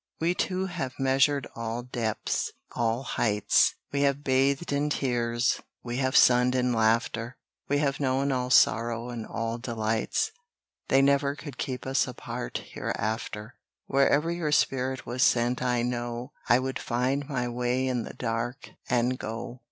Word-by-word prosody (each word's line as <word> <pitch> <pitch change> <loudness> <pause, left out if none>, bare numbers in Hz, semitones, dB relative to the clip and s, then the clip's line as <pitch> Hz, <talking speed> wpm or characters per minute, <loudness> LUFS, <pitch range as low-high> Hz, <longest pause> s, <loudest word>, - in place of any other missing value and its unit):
We 170 +2 +2
two 185 +1 -1
have 165 -9 -4
measured 135 +1 +2
all 115 +1 -3
depths, 115 -3 -2 0.2
all 115 +2 0
heights; 105 -5 +2 0.2
We 140 - 0
have 140 0 +1
bathed 140 +3 +1
in 145 +1 +1
tears, 120 -4 0 0.2
we 120 0 -4
have 130 -1 0
sunned 125 +1 +5
in 125 -1 +2
laughter; 115 +1 +1 0.3
We 145 - +3
have 145 -1 0
known 135 0 +1
all 125 -1 -1
sorrow, 115 -1 +3
and 120 -2 -5
all 115 +1 -3
delights, 115 - -1 0.6
They 135 +1 +4
never 140 0 +3
could 145 -2 -9
keep 130 -2 -3
us 135 +1 +1
apart 115 - -5
hereafter. 110 +1 -3 0.3
Wherever 140 +4 +3
your 170 -3 -1
spirit 130 -2 +1
was 125 +2 -3
sent 120 0 +3
I 125 -1 +1
know, 120 +1 -3 0.2
I 120 - +7
would 130 +1 -2
find 130 +4 -1
my 125 -3 -1
way 125 +2 0
in 125 -2 0
the - - -8
dark, 120 +2 -3 0.2
and 125 +1 +1
go. 115 +3 -6
125 Hz, 150 wpm, -27 LUFS, 120-135 Hz, 0.6 s, I